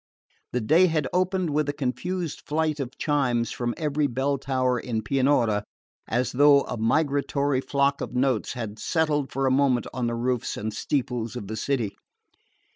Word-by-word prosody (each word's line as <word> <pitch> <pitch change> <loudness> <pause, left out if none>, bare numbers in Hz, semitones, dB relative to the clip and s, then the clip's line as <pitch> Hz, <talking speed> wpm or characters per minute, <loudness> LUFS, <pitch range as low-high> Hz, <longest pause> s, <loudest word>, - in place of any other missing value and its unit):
The 125 - -1
day 165 +11 +5
had 155 -5 0
opened 185 -2 +1
with 150 0 +1
a - - 0
confused 150 +6 -3
flight 155 0 0
of 130 -1 -5
chimes 125 -6 +1
from 120 -1 -2
every 150 -1 0
bell 135 +2 -1
tower 130 -2 0
in 110 -2 -3
Pianura, 125 -5 +2 0.4
as 120 +3 0
though 140 +1 +6
a 125 - -4
migratory 140 +2 +1
flock 140 0 +1
of - - -5
notes 130 -3 +1
had 110 -4 -6
settled 150 -4 0
for 135 0 -1
a 130 - +3
moment 130 -2 +2
on 125 -1 -1
the 120 - -1
roofs 125 0 -1
and 110 +1 -3
steeples 120 -1 -2
of 120 - -5
the 110 +3 -5
city. 115 -2 -1
135 Hz, 170 wpm, -25 LUFS, 120-145 Hz, 0.4 s, though